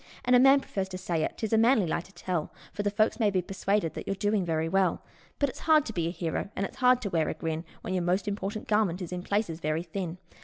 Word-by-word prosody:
And 250 Hz, +1 st, +5 dB
a -, -, +7 dB
man 270 Hz, +2 st, +6 dB
prefers 195 Hz, -6 st, -3 dB
to 185 Hz, -, -5 dB
say 175 Hz, -3 st, -1 dB
it -, -, -3 dB
'tis 220 Hz, -1 st, -2 dB
a 220 Hz, -, +5 dB
manly 225 Hz, -3 st, +4 dB
lie 170 Hz, -, -1 dB
to 195 Hz, -, -18 dB
tell, 175 Hz, -4 st, -3 dB, 0.2 s
For -, -, -2 dB
the 205 Hz, -, +1 dB
folks 215 Hz, +3 st, +1 dB
may 215 Hz, -3 st, +4 dB
be 185 Hz, -2 st, 0 dB
persuaded 195 Hz, -1 st, -1 dB
that -, -, -7 dB
you're 195 Hz, -, -1 dB
doing 205 Hz, 0 st, +1 dB
very 160 Hz, -2 st, 0 dB
well; 185 Hz, 0 st, +1 dB, 0.3 s
But 285 Hz, -, +1 dB
it's -, -, -9 dB
hard 310 Hz, -2 st, +6 dB
to 225 Hz, -, -5 dB
be 170 Hz, -3 st, -1 dB
a -, -, 0 dB
hero, 170 Hz, +1 st, -3 dB
and 195 Hz, -, -1 dB
it's -, -, -9 dB
hard 250 Hz, -1 st, +4 dB
to 200 Hz, -, -3 dB
wear 160 Hz, -2 st, +1 dB
a -, -, -3 dB
grin, 160 Hz, 0 st, -3 dB, 0.2 s
When 185 Hz, -, -4 dB
your 185 Hz, -, +1 dB
most 180 Hz, +3 st, 0 dB
important 205 Hz, +1 st, -3 dB
garment 205 Hz, -4 st, +1 dB
is 175 Hz, -, -7 dB
in 180 Hz, -, -3 dB
places 200 Hz, -4 st, -1 dB
very 155 Hz, +1 st, -1 dB
thin. 175 Hz, 0 st, -5 dB
195 Hz, 275 wpm, -28 LUFS, 170-215 Hz, 0.3 s, a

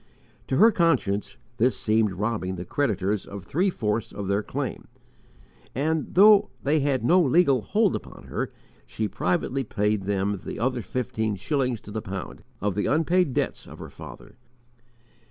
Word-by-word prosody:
To 130 Hz, -, 0 dB
her 225 Hz, +3 st, +7 dB
conscience, 140 Hz, -, +1 dB, 0.2 s
this 125 Hz, +2 st, +2 dB
seemed 110 Hz, -2 st, +2 dB
robbing 100 Hz, -1 st, -2 dB
the 90 Hz, 0 st, -6 dB
creditors 105 Hz, -4 st, 0 dB
of 100 Hz, -2 st, -8 dB
three 180 Hz, -, +1 dB
fourths 110 Hz, -, -2 dB
of 100 Hz, -1 st, -5 dB
their 100 Hz, +1 st, +1 dB
claim, -, -, -5 dB, 0.9 s
and, 155 Hz, +6 st, -1 dB
though 205 Hz, +2 st, +7 dB
they 150 Hz, +3 st, +2 dB
had 135 Hz, -4 st, 0 dB
no 180 Hz, +7 st, +5 dB
legal 140 Hz, -4 st, +4 dB
hold 210 Hz, -, +1 dB
upon -, -, -8 dB
her, -, -, -3 dB, 0.4 s
she 110 Hz, -, -2 dB
privately 115 Hz, +8 st, -1 dB
paid 105 Hz, -2 st, -1 dB
them 100 Hz, 0 st, -1 dB
the -, -, -6 dB
other 125 Hz, +2 st, 0 dB
fifteen 110 Hz, 0 st, -2 dB
shillings 125 Hz, -, -1 dB
to 105 Hz, -, -11 dB
the 110 Hz, +1 st, -3 dB
pound, 95 Hz, -3 st, -7 dB, 0.2 s
of 100 Hz, 0 st, 0 dB
the 105 Hz, -, -1 dB
unpaid 165 Hz, -1 st, +2 dB
debts -, -, -2 dB
of -, -, -11 dB
her -, -, -9 dB
father. -, -, -12 dB
115 Hz, 160 wpm, -25 LUFS, 100-145 Hz, 0.9 s, her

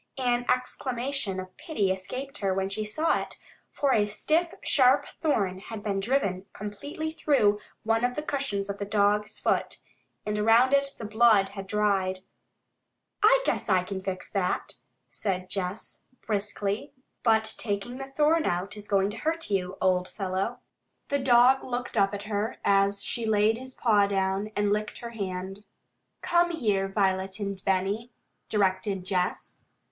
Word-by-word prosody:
An 245 Hz, -2 st, 0 dB
exclamation 250 Hz, -4 st, -1 dB
of 185 Hz, 0 st, -8 dB
pity 205 Hz, -, 0 dB
escaped 255 Hz, +10 st, -5 dB
her 195 Hz, -2 st, 0 dB
when 190 Hz, 0 st, -1 dB
she 215 Hz, +2 st, -3 dB
saw 310 Hz, +10 st, +1 dB
it, -, -, -8 dB, 0.3 s
for 280 Hz, -2 st, +1 dB
a 205 Hz, -1 st, +3 dB
stiff, 315 Hz, +11 st, +1 dB
sharp 270 Hz, +1 st, +4 dB, 0.2 s
thorn 200 Hz, -, +1 dB
had 210 Hz, +1 st, -8 dB
been 200 Hz, -2 st, -1 dB
driven 195 Hz, -4 st, 0 dB
completely 285 Hz, +10 st, -5 dB
through 240 Hz, -10 st, +2 dB, 0.2 s
one 225 Hz, +1 st, +1 dB
of 245 Hz, 0 st, +1 dB
the 300 Hz, -, -3 dB
cushions 270 Hz, -10 st, -2 dB
of 200 Hz, 0 st, -5 dB
the 200 Hz, -, -2 dB
dog's 210 Hz, +1 st, +1 dB
foot, -, -, 0 dB, 0.5 s
and 210 Hz, 0 st, -1 dB
around 230 Hz, +5 st, +5 dB
it 275 Hz, 0 st, +2 dB
the 225 Hz, -, -6 dB
blood 215 Hz, -2 st, +4 dB
had 195 Hz, -1 st, -8 dB
dried. 195 Hz, -2 st, +1 dB, 1.0 s
"I -, -, +6 dB
guess -, -, -1 dB
I 185 Hz, -2 st, +4 dB
can 190 Hz, +1 st, -5 dB
fix 185 Hz, -1 st, -4 dB
that," 195 Hz, -3 st, -1 dB, 0.3 s
said 185 Hz, -3 st, -3 dB
Jess 195 Hz, +2 st, -4 dB, 0.2 s
briskly. 205 Hz, +3 st, -2 dB, 0.3 s
"But 220 Hz, -1 st, +3 dB
taking 215 Hz, +4 st, -3 dB
the 270 Hz, 0 st, -7 dB
thorn 310 Hz, +2 st, +3 dB
out 180 Hz, +4 st, -2 dB
is 210 Hz, -1 st, -9 dB
going 195 Hz, 0 st, +2 dB
to 215 Hz, -, -8 dB
hurt 320 Hz, +1 st, -2 dB
you, 185 Hz, -1 st, -1 dB
old 185 Hz, -1 st, +2 dB
fellow." 195 Hz, +5 st, -3 dB, 0.5 s
The 280 Hz, -, +1 dB
dog 255 Hz, 0 st, +5 dB
looked 245 Hz, -1 st, -4 dB
up 195 Hz, -2 st, +3 dB
at 205 Hz, -1 st, -5 dB
her 210 Hz, +1 st, -2 dB
as 200 Hz, 0 st, +3 dB
she 230 Hz, -2 st, -2 dB
laid 215 Hz, +1 st, +3 dB
his 260 Hz, 0 st, -6 dB
paw 210 Hz, -4 st, +3 dB
down, 195 Hz, +1 st, -1 dB
and 205 Hz, 0 st, +2 dB
licked 210 Hz, 0 st, -2 dB
her 235 Hz, -1 st, -7 dB
hand. 195 Hz, -2 st, -5 dB, 0.6 s
"Come 345 Hz, 0 st, +3 dB
here, 210 Hz, -, 0 dB
Violet 195 Hz, 0 st, 0 dB
and 200 Hz, -2 st, -4 dB
Benny," 195 Hz, +5 st, 0 dB, 0.4 s
directed 190 Hz, -2 st, 0 dB
Jess. 185 Hz, -1 st, -2 dB
210 Hz, 160 wpm, -27 LUFS, 195-245 Hz, 1.0 s, I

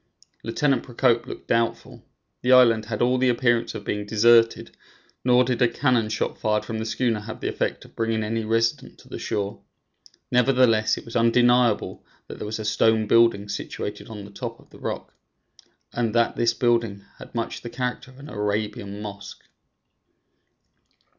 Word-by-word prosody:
Lieutenant 130 Hz, +2 st, +1 dB
Procope 120 Hz, -1 st, +1 dB
looked -, -, -9 dB
doubtful. 115 Hz, 0 st, -1 dB, 0.4 s
The 125 Hz, -, +1 dB
island 115 Hz, -4 st, +5 dB
had 110 Hz, +1 st, -2 dB
all 125 Hz, +1 st, +2 dB
the 130 Hz, 0 st, +3 dB
appearance 120 Hz, -1 st, +1 dB
of -, -, -6 dB
being 105 Hz, 0 st, -3 dB
deserted, 115 Hz, +2 st, +3 dB, 0.5 s
nor 125 Hz, 0 st, +5 dB
did 125 Hz, -1 st, -2 dB
a 125 Hz, -, +6 dB
cannon 120 Hz, -4 st, +1 dB
shot 110 Hz, -, -2 dB
fired 105 Hz, -1 st, 0 dB
from 110 Hz, -1 st, -4 dB
the 110 Hz, -, -3 dB
schooner 115 Hz, -2 st, 0 dB
have 110 Hz, +1 st, -8 dB
the -, -, -3 dB
effect -, -, -3 dB
of -, -, -19 dB
bringing 115 Hz, -1 st, -1 dB
any 115 Hz, +1 st, -2 dB
resident 115 Hz, +1 st, -1 dB
to -, -, -18 dB
the -, -, -6 dB
shore. 100 Hz, -2 st, -3 dB, 0.7 s
Nevertheless, 125 Hz, -3 st, +3 dB
it -, -, -9 dB
was 115 Hz, -, -10 dB
undeniable 120 Hz, 0 st, +3 dB, 0.2 s
that -, -, -9 dB
there -, -, -5 dB
was 110 Hz, -, -3 dB
a 110 Hz, -, -6 dB
stone 110 Hz, +1 st, +2 dB
building 115 Hz, -2 st, +3 dB
situated 105 Hz, 0 st, -5 dB
on 105 Hz, -3 st, -8 dB
the 100 Hz, -, -12 dB
top -, -, -6 dB
of -, -, -22 dB
the -, -, -15 dB
rock, -, -, -5 dB, 0.8 s
and 115 Hz, -2 st, -1 dB
that 115 Hz, 0 st, +2 dB
this 115 Hz, 0 st, +1 dB
building 115 Hz, -5 st, 0 dB
had -, -, -12 dB
much 115 Hz, -1 st, -3 dB
the 120 Hz, -, -7 dB
character 125 Hz, +1 st, -4 dB
of 130 Hz, -, -17 dB
an 140 Hz, +2 st, -11 dB
Arabian 105 Hz, -2 st, -3 dB
mosque. 100 Hz, -1 st, -9 dB
115 Hz, 175 wpm, -24 LUFS, 110-120 Hz, 0.8 s, a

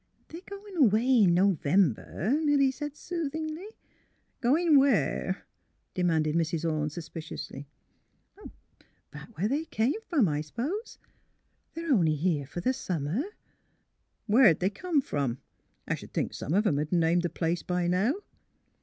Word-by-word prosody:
" -, -, -39 dB
They're 335 Hz, -, -9 dB
going 400 Hz, -1 st, -9 dB
away 240 Hz, -2 st, +4 dB
in 170 Hz, -2 st, +4 dB
November," 185 Hz, -, +1 dB
Milly 285 Hz, -3 st, +3 dB
said, 295 Hz, +2 st, -6 dB
soothingly, 320 Hz, +1 st, -4 dB, 0.4 s
'' -, -, -44 dB
Goin' 295 Hz, +4 st, +4 dB
where? 275 Hz, 0 st, +1 dB, 0.2 s
" -, -, -46 dB
demanded 160 Hz, -4 st, +1 dB
Mrs. 165 Hz, 0 st, 0 dB
Orne, 155 Hz, -1 st, 0 dB
sus 160 Hz, +1 st, -8 dB
piciously. 155 Hz, -4 st, -8 dB, 0.7 s
" -, -, -18 dB
Back 230 Hz, -, -12 dB
where 195 Hz, -, +1 dB
they 290 Hz, +7 st, -1 dB
came 265 Hz, -, 0 dB
from, 285 Hz, -, +3 dB
I 150 Hz, -1 st, -1 dB
suppose. 275 Hz, -, -4 dB, 0.8 s
They're 330 Hz, -3 st, 0 dB
only 165 Hz, -9 st, +3 dB
here 150 Hz, -3 st, 0 dB
for 175 Hz, +4 st, -6 dB
the 255 Hz, +8 st, +1 dB
summer." 180 Hz, -, -2 dB, 0.4 s
' -, -, -44 dB
' -, -, -48 dB
Where 225 Hz, -1 st, +6 dB
'd -, -, -25 dB
they 190 Hz, +2 st, +1 dB
come 315 Hz, -, 0 dB
from? 140 Hz, -, -2 dB, 0.5 s
I -, -, 0 dB
sh -, -, -5 dB
'd -, -, -17 dB
think -, -, -1 dB
some 155 Hz, -, -3 dB
of 210 Hz, +2 st, +3 dB
'em 150 Hz, -7 st, +2 dB
'd 155 Hz, -, -9 dB
name 170 Hz, 0 st, +3 dB
the 175 Hz, 0 st, -1 dB
place 165 Hz, +1 st, -1 dB
by 180 Hz, -1 st, -1 dB
now." 195 Hz, -, +2 dB
200 Hz, 165 wpm, -28 LUFS, -, 0.8 s, Where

